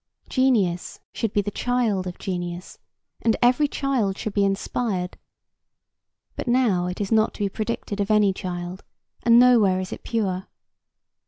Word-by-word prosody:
Genius 215 -10 +1
should 225 -3 -2
be 205 - +1
the 205 - -3
child 225 -6 0
of 180 - -6
genius 175 -1 -5 0.4
and 225 - +2
every 250 +5 +4
child 250 -9 -1
should 215 - -4
be 200 - +2
inspired; 195 -1 -1 1.2
but - - -5
now 235 -8 +2
it 180 - -5
is 205 0 -3
not 220 -1 +3
to - - -8
be 200 - +1
predicted 215 -1 -4
of 200 - -2
any 210 -2 +4
child, 180 0 -6 0.4
and 235 0 +5
nowhere 225 -7 +5
is 185 0 -4
it - - -8
pure. 190 -5 -2
205 Hz, 155 wpm, -24 LUFS, 185-235 Hz, 1.2 s, and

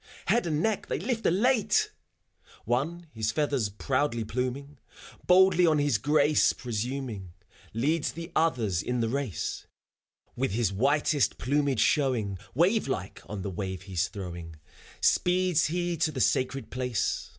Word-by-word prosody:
Head 235 -6 +2
and 155 -1 0
neck 220 -2 0
they - - -1
lift 230 +2 -1
elate!... 220 +6 +2 0.7
One, 150 +9 -1
his 110 -1 -1
feathers 140 -5 0
proudly 120 +3 -1
pluming, 130 +5 -4 0.5
Boldly 180 -1 +6
on 155 -2 +3
his 145 -7 +2
grace 150 +4 +3
presuming. 120 -5 -4 0.4
Leads 150 +7 0
the 170 +1 -8
others 115 - +1
in 125 +2 -2
the 115 - 0
race; 135 -6 -3 0.7
With 130 -5 -1
his 110 -3 0
whitest 145 +6 +2
plumage 140 -3 +1
showing 115 - +1 0.2
Wave 185 - +3
like 95 -8 -4
on 105 -3 -5
the 100 - -3
wave 95 0 -5
he's 95 -2 -1
throwing, 85 -4 -7 0.5
Speeds 180 -2 +3
he 175 +1 -1
to 155 0 +1
the 135 - -5
sacred 130 +2 0
place. 125 -4 -2
135 Hz, 140 wpm, -28 LUFS, 110-160 Hz, 0.7 s, Boldly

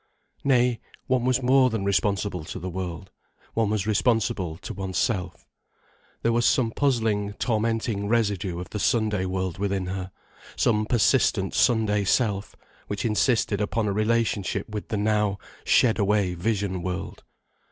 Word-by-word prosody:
Nay, 125 -3 +3 0.3
one 130 -2 +1
was 130 0 +1
more 130 +1 +5
than 110 -4 -2
responsible 100 -1 0
to - - -6
the 90 +1 -5
world. 95 +1 -5 0.4
One 115 -2 +1
was 105 -2 -1
responsible 105 -6 0
to 100 +5 -7
oneself. 95 0 -2 0.8
There 115 - +3
was 120 +1 +2
some 120 -2 +3
puzzling, 110 -7 0
tormenting 110 -2 -1
residue 100 -6 0
of 90 - -8
the 105 - -3
Sunday 105 -4 +1
world 95 -1 -3
within 100 -2 -1
her, 95 0 -5 0.4
some 105 -2 +1
persistent 115 -5 +2
Sunday 110 -4 +2
self, 100 -1 0 0.3
which 100 +1 -3
insisted 110 -2 +1
upon 105 +1 0
a 100 - 0
relationship 110 -1 0
with 105 -2 -6
the 110 - -2
now 105 -1 +1 0.3
shed 115 -3 +4
away 100 -2 +2
vision 95 0 -1
world. 90 +1 -5
105 Hz, 140 wpm, -25 LUFS, 95-115 Hz, 0.8 s, more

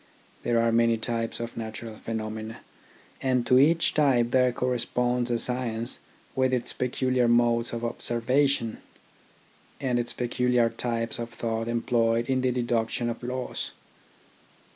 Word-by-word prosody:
There 120 -1 +1
are 115 0 +3
many 115 0 +3
types 115 0 -3
of 115 0 -5
natural 110 0 -6
pheno 110 0 -4
mena, 110 +1 -7 0.6
and 130 -2 +1
to 125 +1 +5
each 160 +4 +4
type 125 -6 +3
there 125 -1 +4
corresponds 125 0 0
a 120 - +1
science 120 -1 -1 0.4
with 130 -1 +2
its 125 -1 0
peculiar 125 0 +1
modes 120 0 +3
of 120 0 -3
observation, 120 +1 +1 1.0
and 125 -3 0
its 120 - -2
peculiar 125 -1 +1
types 115 -1 -2
of 115 0 -4
thought 115 -1 -3
employed 115 0 +1
in 130 -1 +2
the 130 - +2
deduction 120 -1 0
of 115 - -8
laws. 125 +1 -4
120 Hz, 140 wpm, -27 LUFS, 115-125 Hz, 1.0 s, to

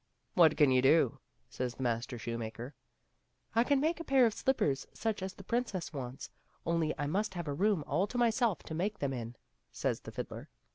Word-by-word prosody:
" - - -46
What 160 -2 +7
can 145 -3 +5
you 130 0 +5
do 135 -1 +4
?" - - -43
says 125 -1 -3
the 130 - -5
master 120 +1 -1
shoemaker. 115 +3 -5 0.4
" - - -38
I 230 - +5
can 280 +2 +3
make 320 +4 +1
a - - -4
pair 270 -5 +5
of 225 - +2
slippers 150 - 0
such 220 -3 -2
as 190 0 -4
the 195 - -11
princess 205 -6 -2
wants, 130 -2 -6 0.3
only 165 -2 +1
I 145 - -1
must 190 +6 -1
have 170 -3 -4
a 145 - -1
room 190 +1 +2
all 195 - +1
to 245 - -5
myself 235 -3 +2
to - - -7
make 200 +6 -1
them 140 -6 -1
in," 120 -1 -5 0.4
says - - -1
the - - -10
fiddler. - - -6
165 Hz, 220 wpm, -32 LUFS, 130-220 Hz, 0.4 s, What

